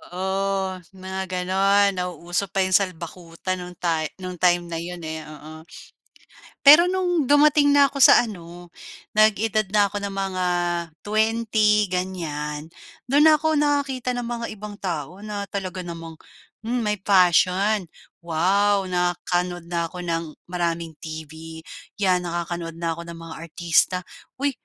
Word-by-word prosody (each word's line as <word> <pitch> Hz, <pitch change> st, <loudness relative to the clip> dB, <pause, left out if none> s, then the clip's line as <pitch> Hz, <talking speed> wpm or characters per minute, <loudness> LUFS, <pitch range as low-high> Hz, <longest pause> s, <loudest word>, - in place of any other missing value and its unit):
Oo, 190 Hz, 0 st, -1 dB, 0.2 s
mga 190 Hz, 0 st, -5 dB
gano'n, 195 Hz, +2 st, +2 dB
nauuso 180 Hz, +2 st, -3 dB
pa 195 Hz, +1 st, 0 dB
'yong 185 Hz, -, -2 dB
salbakuta 180 Hz, -1 st, -2 dB
no'ng 180 Hz, 0 st, -8 dB
ta 165 Hz, -2 st, -1 dB
nung 185 Hz, -2 st, -7 dB
time 175 Hz, -1 st, +3 dB
na 170 Hz, -1 st, -5 dB
'yon, 175 Hz, 0 st, -7 dB
eh, 160 Hz, -1 st, -6 dB
oo. 155 Hz, +1 st, -11 dB, 1.0 s
Pero 300 Hz, +4 st, +9 dB
no'ng 355 Hz, -4 st, +1 dB
dumating 290 Hz, +1 st, +5 dB
na 285 Hz, -1 st, +6 dB
ko 275 Hz, -1 st, +1 dB
sa 240 Hz, -, +7 dB
ano, 175 Hz, -3 st, -10 dB, 0.5 s
nag-edad 215 Hz, 0 st, +3 dB
na 205 Hz, -1 st, +4 dB
ko 205 Hz, +1 st, -5 dB
ng 200 Hz, -, -3 dB
mga 195 Hz, -2 st, -2 dB, 0.5 s
20 215 Hz, -1 st, +2 dB
ganyan, 160 Hz, -5 st, -4 dB, 0.4 s
do'n 285 Hz, +4 st, +4 dB
na 310 Hz, -1 st, +6 dB
ko 315 Hz, +1 st, +1 dB
nakakita 285 Hz, -4 st, 0 dB
ng 245 Hz, -1 st, -3 dB
mga 235 Hz, -1 st, -3 dB
ibang 210 Hz, 0 st, -8 dB
tao 175 Hz, +2 st, -4 dB
na 205 Hz, -1 st, -5 dB
talaga 190 Hz, -2 st, -5 dB
namang, 165 Hz, -2 st, -8 dB, 0.5 s
hmm, 245 Hz, +1 st, 0 dB
may 210 Hz, -1 st, -1 dB
fashion. 185 Hz, +1 st, +3 dB, 0.4 s
Wow! 195 Hz, +5 st, +2 dB
Nakanuod 175 Hz, -1 st, -1 dB
na 170 Hz, -1 st, 0 dB
ko 180 Hz, +1 st, -8 dB
ng 165 Hz, -2 st, -3 dB, 0.2 s
maraming 170 Hz, -2 st, -2 dB
TV, 160 Hz, +1 st, -9 dB, 0.3 s
'yan 185 Hz, -3 st, +2 dB
nakakanood 170 Hz, -1 st, -4 dB
na 165 Hz, 0 st, -2 dB
ko 170 Hz, -, -8 dB
ng 170 Hz, -, -8 dB
mga 165 Hz, -1 st, -9 dB
artista. 170 Hz, +2 st, +2 dB, 0.4 s
'Uy! 280 Hz, +1 st, 0 dB
185 Hz, 140 wpm, -23 LUFS, 170-210 Hz, 1.0 s, Pero